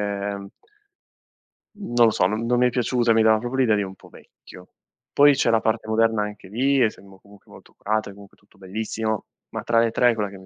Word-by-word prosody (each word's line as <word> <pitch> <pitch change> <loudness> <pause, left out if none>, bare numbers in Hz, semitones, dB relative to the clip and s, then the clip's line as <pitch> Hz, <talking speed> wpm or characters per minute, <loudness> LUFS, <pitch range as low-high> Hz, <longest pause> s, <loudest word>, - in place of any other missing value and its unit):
non 100 -1 -4 1.6
lo - - +4
so, 90 - +1
non 110 +4 -2
non 120 0 +1
mi 125 - +4
è - - -3
piaciuta, 120 -1 +1
mi 110 - +3
dava 110 0 +4
proprio 120 +3 -6
l'idea 120 -5 +2
di 105 - 0
un 95 -1 -7
po' - - -18
vecchio. 90 - -17 0.4
Poi 145 0 +5
c'è 125 - +1
la 115 -1 +3
parte 110 0 -1
moderna 110 -1 +1
anche 105 -2 -7
lì, 135 +5 +1
essendo 100 -4 -2
comunque 100 0 -21
molto - - -17
curata 110 0 -2
e 100 - -13
comunque 100 0 -16
tutto 100 -1 -28
bellissimo, 110 +2 -4 0.2
ma - - -5
tra 115 -1 +1
le 115 -1 +2
3 125 - +3
è - - -4
quella 105 -2 -3
che 100 - -12
mi 95 - -16
110 Hz, 225 wpm, -23 LUFS, 100-115 Hz, 1.6 s, Poi